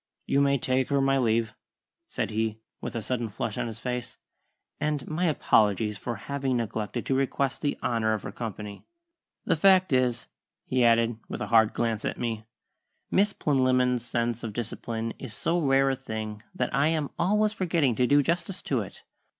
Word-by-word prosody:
"You 140 Hz, -, +2 dB
may 140 Hz, 0 st, +3 dB
take 130 Hz, 0 st, +1 dB
her 140 Hz, -1 st, +2 dB
my 135 Hz, 0 st, +3 dB
leave," 115 Hz, -2 st, +1 dB, 0.5 s
said -, -, -3 dB
he, 110 Hz, 0 st, -1 dB, 0.2 s
with -, -, -5 dB
a 115 Hz, -, -2 dB
sudden 120 Hz, -2 st, -2 dB
flush 105 Hz, +1 st, -3 dB
on -, -, -1 dB
his 115 Hz, -1 st, -6 dB
face, 125 Hz, -1 st, -4 dB, 0.6 s
"and 150 Hz, -2 st, -1 dB
my 165 Hz, +4 st, -1 dB
apologies 105 Hz, -, +2 dB
for 120 Hz, -, -3 dB
having 135 Hz, +2 st, -2 dB
neglected 115 Hz, 0 st, -3 dB
to -, -, 0 dB
request 135 Hz, 0 st, 0 dB
the 145 Hz, -, -1 dB
honour 110 Hz, -2 st, +1 dB
of 105 Hz, -4 st, -3 dB
her -, -, -5 dB
company. 105 Hz, -2 st, -7 dB, 0.6 s
The -, -, +3 dB
fact 185 Hz, -1 st, +5 dB
is," 125 Hz, -2 st, +2 dB, 0.4 s
he 130 Hz, -1 st, +1 dB
added, 115 Hz, -1 st, +3 dB
with -, -, -4 dB
a -, -, -3 dB
hard 110 Hz, -1 st, +6 dB
glance 115 Hz, -2 st, -1 dB
at -, -, -2 dB
me, 115 Hz, -3 st, -3 dB, 0.7 s
"Miss 200 Hz, +2 st, +3 dB
Plinlimmon's 130 Hz, -, +2 dB
sense 120 Hz, -1 st, -2 dB
of 110 Hz, -2 st, -4 dB
discipline 115 Hz, 0 st, -4 dB
is 115 Hz, -5 st, -6 dB
so 170 Hz, +9 st, 0 dB
rare 135 Hz, -1 st, +3 dB
a -, -, 0 dB
thing 110 Hz, -5 st, -6 dB
that 125 Hz, -, -1 dB
I 140 Hz, +3 st, +3 dB
am 155 Hz, -3 st, 0 dB
always 210 Hz, +4 st, +2 dB
forgetting 170 Hz, -, +1 dB
to 125 Hz, -, +3 dB
do 145 Hz, +2 st, +5 dB
justice 175 Hz, +4 st, -1 dB
to -, -, 0 dB
it. -, -, -9 dB
125 Hz, 185 wpm, -27 LUFS, 115-140 Hz, 0.7 s, hard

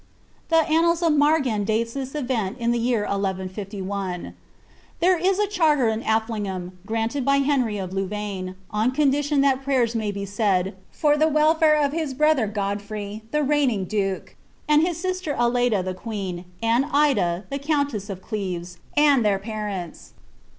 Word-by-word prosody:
The 325 Hz, -1 st, +4 dB
annals 335 Hz, +2 st, +2 dB
of 330 Hz, -2 st, +4 dB
Margan 290 Hz, -8 st, +2 dB
date 225 Hz, +2 st, 0 dB
this 270 Hz, 0 st, -5 dB
event 245 Hz, -7 st, -2 dB
in 235 Hz, -1 st, 0 dB
the 240 Hz, -, +1 dB
year 230 Hz, -2 st, +1 dB
1 200 Hz, 0 st, -1 dB
151. 190 Hz, -1 st, -4 dB, 0.7 s
There 365 Hz, +2 st, +4 dB
is 370 Hz, +3 st, +1 dB
a 415 Hz, -, +2 dB
charter 315 Hz, -, +2 dB
in 220 Hz, 0 st, -2 dB
Affligham, 210 Hz, -5 st, -2 dB, 0.2 s
granted 225 Hz, +5 st, -1 dB
by 275 Hz, +2 st, +3 dB
Hemy 260 Hz, -7 st, +1 dB
of 185 Hz, -2 st, -5 dB
Louvaine, 195 Hz, -1 st, -3 dB, 0.2 s
on 215 Hz, +3 st, +1 dB
condition 290 Hz, 0 st, +2 dB
tliat 270 Hz, -1 st, +2 dB
prayera 255 Hz, -4 st, +1 dB
may 220 Hz, -2 st, -1 dB
be 200 Hz, 0 st, -4 dB
eaid, 195 Hz, -2 st, 0 dB, 0.2 s
for 295 Hz, -1 st, +2 dB
the 310 Hz, +1 st, +4 dB
welfare 310 Hz, 0 st, +4 dB
of 290 Hz, -2 st, +2 dB
his 305 Hz, -4 st, -3 dB
brother 300 Hz, -5 st, +3 dB
God 200 Hz, -1 st, -2 dB
frey, 205 Hz, 0 st, -6 dB
the 300 Hz, +3 st, 0 dB
reigning 270 Hz, -9 st, +1 dB
duke, 195 Hz, -1 st, -2 dB, 0.3 s
his 310 Hz, +3 st, +3 dB
sister 370 Hz, -4 st, -2 dB
Aleyda 240 Hz, -4 st, +2 dB
the 185 Hz, -, -2 dB
queen, 185 Hz, -3 st, -5 dB, 0.2 s
and 235 Hz, +4 st, +3 dB
Ida, 260 Hz, -12 st, +2 dB
the 275 Hz, -, -2 dB
counter 285 Hz, -4 st, 0 dB
of 190 Hz, -1 st, -8 dB
Cleres, 180 Hz, -5 st, -4 dB, 0.2 s
and 290 Hz, -4 st, +5 dB
their 205 Hz, -2 st, +2 dB
parents. 200 Hz, -4 st, -6 dB
230 Hz, 160 wpm, -23 LUFS, 200-290 Hz, 0.7 s, and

